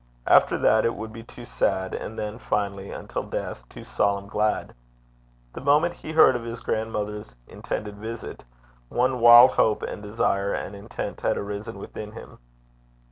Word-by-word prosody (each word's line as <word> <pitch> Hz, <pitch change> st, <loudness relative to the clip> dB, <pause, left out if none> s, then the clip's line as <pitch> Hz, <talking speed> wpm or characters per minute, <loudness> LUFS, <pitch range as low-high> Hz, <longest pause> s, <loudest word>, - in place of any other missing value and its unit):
After -, -, +5 dB
that, 110 Hz, -, +3 dB
it 115 Hz, -, 0 dB
would 110 Hz, +1 st, -7 dB
be 115 Hz, -, -8 dB
too 120 Hz, +1 st, -12 dB
sad, 95 Hz, -5 st, -1 dB
and 110 Hz, -, -6 dB
then, 105 Hz, +2 st, -4 dB
finally, 100 Hz, -3 st, -2 dB
until -, -, -5 dB
death, -, -, -6 dB
too -, -, -11 dB
solemn 100 Hz, -1 st, 0 dB
glad. 105 Hz, +1 st, -1 dB, 0.8 s
The -, -, -7 dB
moment 150 Hz, +5 st, +3 dB
he 160 Hz, -, -9 dB
heard 155 Hz, -5 st, +6 dB
of 120 Hz, -, -3 dB
his 115 Hz, 0 st, -6 dB
grandmother's 105 Hz, -, -3 dB
intended 105 Hz, -1 st, -5 dB
visit, 110 Hz, +1 st, -7 dB, 0.5 s
one 125 Hz, +1 st, +1 dB
wild 120 Hz, +2 st, +9 dB
hope 110 Hz, -4 st, +2 dB
and -, -, -5 dB
desire 100 Hz, -1 st, 0 dB
and 100 Hz, -, -5 dB
intent 100 Hz, +1 st, -6 dB
had -, -, +1 dB
arisen 105 Hz, +1 st, -5 dB
within 105 Hz, +1 st, -8 dB
him. -, -, -12 dB
110 Hz, 160 wpm, -25 LUFS, 100-120 Hz, 0.8 s, wild